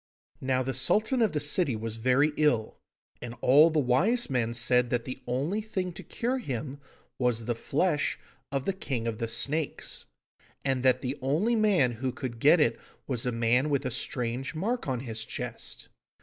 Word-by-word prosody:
Now 130 -1 +1
the 135 +1 -2
Sultan 215 - +2
of 220 - +3
the 150 - 0
city 145 -2 +1
was 110 0 -5
very 130 +6 +3
ill, 125 -8 +1 0.4
and 120 -1 -6
all 145 +6 +6
the 160 - -1
wise 160 - +2
men 120 -2 0
said 125 0 +3
that 120 -1 -1
the 130 - -6
only 145 - -1
thing 185 -4 -3
to - - -8
cure 250 +3 -2
him 135 - -5 0.4
was 120 -3 +1
the 120 - 0
flesh 145 +6 0 0.3
of 135 -1 -2
the 195 - 0
King 135 -11 -3
of 115 -1 -3
the 115 - -1
Snakes, 140 +7 -2 0.6
and 135 -2 +1
that 130 0 +3
the 130 +2 -3
only 160 - +1
man 200 - +3
who 125 +3 -3
could 125 -3 -6
get 150 +7 +6
it 115 -7 +2 0.3
was 125 -2 -2
a - - +1
man 120 +5 +2
with 140 -1 0
a 130 - -1
strange 125 +3 -2
mark 225 +8 -2
on 130 -3 -1
his 115 -4 -5
chest. - - -5
130 Hz, 185 wpm, -28 LUFS, 120-155 Hz, 0.6 s, all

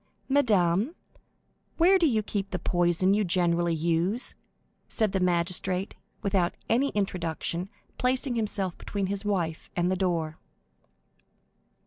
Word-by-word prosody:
"Madame, 220 - +2 0.8
where 370 +3 +5
do 335 - +4
you 220 -6 +1
keep 200 -1 -3
the 180 - -2
poison 175 +2 +2
you 210 +1 +2
generally 175 -2 +1
use?" 170 +8 0 0.6
said 220 -4 0
the 190 - 0
magistrate, 180 +1 0 0.3
without 190 -3 +1
any 255 +5 +2
introduction, 180 -2 -2 0.3
placing 255 +1 +1
himself 205 -5 -1
between 200 -1 -3
his 200 +1 -3
wife 175 -6 -2
and 175 +1 +1
the - - +2
door. 170 -4 -1
190 Hz, 120 wpm, -27 LUFS, 175-215 Hz, 0.8 s, where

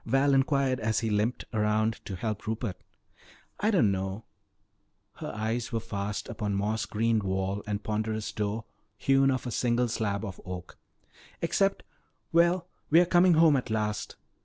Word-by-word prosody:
Val 135 +1 +3
inquired 135 -1 +2
as 110 0 0
he 110 -2 -1
limped 105 +4 0
around 110 0 +1
to 95 - -5
help 105 +3 -4
Rupert. 110 -3 -3 0.8
"I 210 - +2
don't 170 - +4
know," 95 +2 -3 0.9
her - - -5
eyes 110 +3 -2
were 115 - 0
fast 105 -2 -4
upon 105 -3 -2
moss 105 +3 -1
greened 115 0 +1
wall 95 +1 -1
and 105 0 -2
ponderous 110 0 -2
door 105 +1 -2 0.3
hewn 135 +1 +3
of 130 -1 -1
a 125 - -3
single 120 +1 +1
slab 110 -2 -1
of 95 -3 -7
oak, 90 -1 -8 0.6
"except 195 +4 +1 0.5
well, 170 +1 +3 0.2
we 160 - +7
are 175 - +5
coming 175 0 +5
home 160 -2 +6
at 125 -3 -1
last. 105 -1 -2
110 Hz, 160 wpm, -28 LUFS, 105-135 Hz, 0.9 s, we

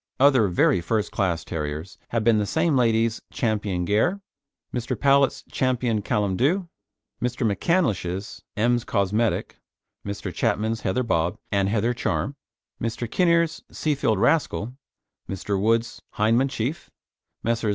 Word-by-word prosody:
Other 130 -6 +5
very 90 0 +3
first 105 +4 -1
class 85 -5 -1
terriers 75 +3 -5
have 115 -2 0
been 110 -1 +4
the 105 - -1
same 160 - +1
lady's 115 -2 +2
Ch. - - -9
Gair, 105 - +1 0.5
Mr. 125 +1 -2
Powlett's 140 +1 +3
Ch. - - -7 0.4
Callum 105 -4 0
Dhu, 170 +8 +1 0.5
Mr. 125 0 -1
McCandlish's 100 - -1 0.2
Ems 120 +2 +2
Cosmetic, 105 +2 0 0.5
Mr. 100 -2 -5
Chapman's 110 0 0
Heather 100 +7 0
Bob 85 -7 0
and 100 -1 +2
Heather 115 +3 +1
Charm, 135 +3 -2 0.5
Mr. 115 +1 -2
Kinnear's 170 +3 +2
Seafield 140 -8 0
Rascal, 125 -2 +1 0.6
Mr. 95 +1 -2
Wood's 115 +2 +1
Hyndman 115 +6 +3
Chief, 130 +5 -3 0.5
Messrs. 115 -1 0
115 Hz, 125 wpm, -24 LUFS, 100-130 Hz, 0.6 s, Other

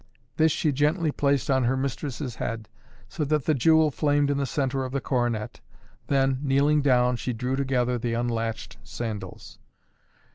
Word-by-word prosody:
This 160 0 +4
she 155 0 +1
gently 150 +4 +1
placed 140 -2 +1
on 130 -2 +2
her 130 +2 +1
mistress' 135 -1 -4
head, 115 -1 -4 0.4
so 155 - -3
that 150 -1 0
the 155 - +3
jewel 160 +3 +4
flamed 145 0 +1
in 140 - 0
the 140 - -1
centre 135 0 -1
of 130 - -5
the 140 - 0
coronet, 120 -5 -2 0.5
then, 135 -1 +2
kneeling 145 +2 +2
down, 125 -3 +3
she 125 - -3
drew 125 +3 -2
together 125 -3 0
the 115 0 -2
unlatched 115 -1 -3
sandals. 110 -3 -7
135 Hz, 160 wpm, -26 LUFS, 120-145 Hz, 0.5 s, This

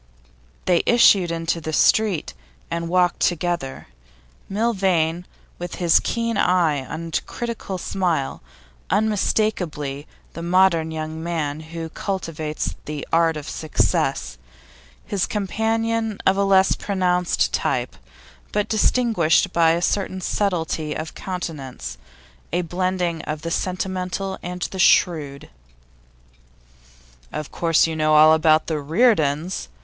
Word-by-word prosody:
They 175 -2 +3
issued 200 -7 +5
into 165 0 -2
the 155 - -4
street, 200 0 +2 0.4
and 170 0 -2
walked 180 0 +2
on - - +6
together; 170 -5 -3 0.6
Milvain, 190 -6 0 0.3
with 175 0 -5
his 175 -3 +4
keen 230 -2 -2
eye 175 -6 +3
and 160 +5 -4
critical 230 -5 -5
smile, 170 -6 -1 0.5
unmistakably 185 -9 0 0.3
the 165 - -7
modern 170 -2 +3
young 160 0 -5
man 160 -3 -2
who 165 +1 -7
cultivates 160 -5 -4
the 150 -1 -5
art 165 -1 +3
of 150 0 -7
success; 65 - -1 0.7
his 200 -3 -1
companion 225 +1 -1
of 190 - +4
a 200 - +1
less 190 -1 +4
pronounced 180 -3 0
type, - - -1 0.6
but 210 -1 0
distinguished 215 -7 +2
by 165 -1 +4
a 170 +1 -1
certain 190 0 -1
subtlety 165 -5 -1
of 155 0 -5
countenance, 135 - -6 0.5
a 175 +1 0
blending 180 -1 -1
of 150 0 -4
the 165 - -3
sentimental 185 +1 -3
and 180 0 -5
the 190 - -6
shrewd. 150 -7 +2 1.8
'Of 150 - -5
course 165 -2 +3
you 165 -1 -3
know 155 0 +2
all 155 +1 +8
about 155 0 +4
the 155 -2 -2
Reardons? 160 - +1
170 Hz, 120 wpm, -22 LUFS, 155-190 Hz, 1.8 s, all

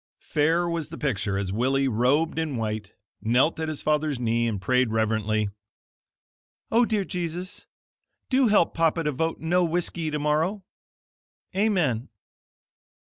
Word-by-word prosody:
Fair 165 +4 +1
was 165 -3 -2
the 165 - -8
picture, 105 -8 -1
as 100 -1 -2
Willie, 135 +6 +1
robed 135 +8 +1
in 155 -4 -2
white, 110 -2 -4 0.3
knelt 125 +9 +2
at 160 -1 -2
his 155 - -4
father's 150 -3 +1
knee 115 0 +1
and 105 -4 -2
prayed 125 +6 +2
reverently: 110 -1 0 1.2
"O 235 +2 +5
dear 210 -4 0
Jesus, 180 +1 -5 0.6
do 260 -1 +3
help 205 -5 +3
papa 165 0 +1
to 150 - 0
vote 160 +4 -2
No 175 +3 +2
Whiskey 170 -1 0
tomorrow. 155 +7 0 0.9
Amen." 175 - +1
150 Hz, 130 wpm, -25 LUFS, 115-170 Hz, 1.2 s, O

